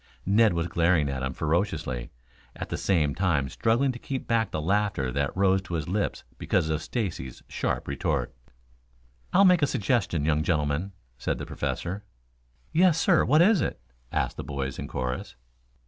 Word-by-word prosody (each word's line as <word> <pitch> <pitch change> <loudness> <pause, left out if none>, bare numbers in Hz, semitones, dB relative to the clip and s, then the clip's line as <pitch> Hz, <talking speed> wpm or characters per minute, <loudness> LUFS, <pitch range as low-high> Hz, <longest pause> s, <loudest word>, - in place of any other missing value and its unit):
Ned 105 +2 +4
was 85 0 -1
glaring 85 -3 +2
at 65 -1 -3
him 65 0 -1
ferociously, 80 -7 -1 0.5
at - - -6
the - - -2
same 80 -7 +2
time 80 -7 +1
struggling 120 - +1
to 120 - -8
keep 135 +1 -4
back 115 -2 +1
the - - -3
laughter 95 -6 0
that 70 +6 -1
rose 95 0 +3
to 95 -2 -5
his 80 -3 -3
lips 100 +4 -1 0.2
because 80 - +1
of 80 0 0
Stacy's 80 - -4
sharp - - -2
retort. - - -1 1.0
"I'll 200 - +6
make 180 -3 +5
a 145 - +4
suggestion, 100 - 0
young 75 -1 +2
gentlemen," 75 +3 0 0.3
said - - -1
the - - -5
Professor. 95 +4 -3 0.7
"Yes, 170 0 +4
sir, 175 -2 +4
what 155 +3 +5
is 205 -1 +4
it?" - - -2 0.3
asked - - -1
the - - -4
boys 70 -2 -4
in - - -4
chorus. 65 -1 -4
90 Hz, 170 wpm, -27 LUFS, 75-115 Hz, 1.0 s, I'll